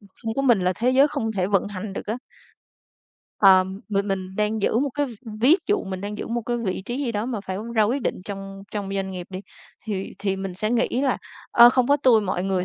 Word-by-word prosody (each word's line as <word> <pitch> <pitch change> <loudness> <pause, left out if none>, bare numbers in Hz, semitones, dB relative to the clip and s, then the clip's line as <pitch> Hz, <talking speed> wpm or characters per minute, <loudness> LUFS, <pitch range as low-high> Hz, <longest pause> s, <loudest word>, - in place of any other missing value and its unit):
ừm, 200 - -19
không 225 0 -3
có 275 - 0
mình 240 -7 +4
là 180 0 +2
thế 245 +2 +2
giới 270 +3 +5
không 255 -7 -2
thể 185 -3 0
vận 200 0 +1
hành 200 0 -6
được - - -6
á. 220 - -2 1.2
Ờm, 190 0 +5
m 200 -1 0
mình 190 -1 -3
đang 210 0 0
giữ 225 - +2
một 285 - +1
cái 290 -1 0
v - - -8 0.3
ví 290 +9 +6
dụ 410 -1 +1
mình 190 -1 -5
đang 205 +1 -5
giữ - - -4
một 235 +1 -2
cái 240 - 0
vị 195 -5 -3
trí 255 +6 -3
gì 235 - -2
đó 210 +2 -2
mà 235 -5 -3
phải 190 -1 -5 0.2
ra 220 - +4
quyết 245 +6 0
định - - -2
trong 195 -1 -7
trong 205 -2 -3
doanh 190 -1 -2
nghiệp 180 -2 -6
đi, 185 0 -5 0.4
thì 200 -4 -4
thì 195 -1 -1
mình 190 -2 -5
sẽ 215 +4 -2
nghĩ 240 0 +2
là 270 -2 +1 0.3
"Ơ, 240 +1 +8
không 255 -1 +2
có 285 - +4
tui 255 -6 +4
mọi 185 -2 -2
người 190 -2 0
210 Hz, 255 wpm, -24 LUFS, 195-240 Hz, 1.2 s, Ơ